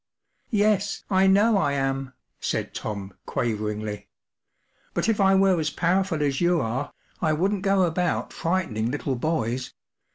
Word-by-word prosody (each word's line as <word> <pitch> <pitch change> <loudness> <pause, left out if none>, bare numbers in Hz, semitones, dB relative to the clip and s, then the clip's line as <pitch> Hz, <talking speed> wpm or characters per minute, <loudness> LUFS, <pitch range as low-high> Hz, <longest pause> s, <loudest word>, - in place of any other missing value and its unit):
“ - - -46
Yes, 205 -2 +1
I 190 0 +4
know 200 +2 +5
I 145 -6 +1
am/ 135 -1 0
5 - - -29 0.3
said - - -2
Tom, 100 -2 -5
quaveringly. 105 -2 -2 0.5
“ - - -40
But - - 0
if 220 -3 +2
I 195 0 +5
were 190 -2 +4
as 155 -1 0
powerful 175 0 +1
as 140 0 0
you 175 0 +3
are, 130 +3 -2 0.3
I 155 -2 +2
wouldn't 190 +5 0
go 195 -1 +3
about 175 +1 0
frightening 165 -11 -1
little 135 0 -2
boys. 125 -3 -2
165 Hz, 160 wpm, -25 LUFS, 130-195 Hz, 0.5 s, know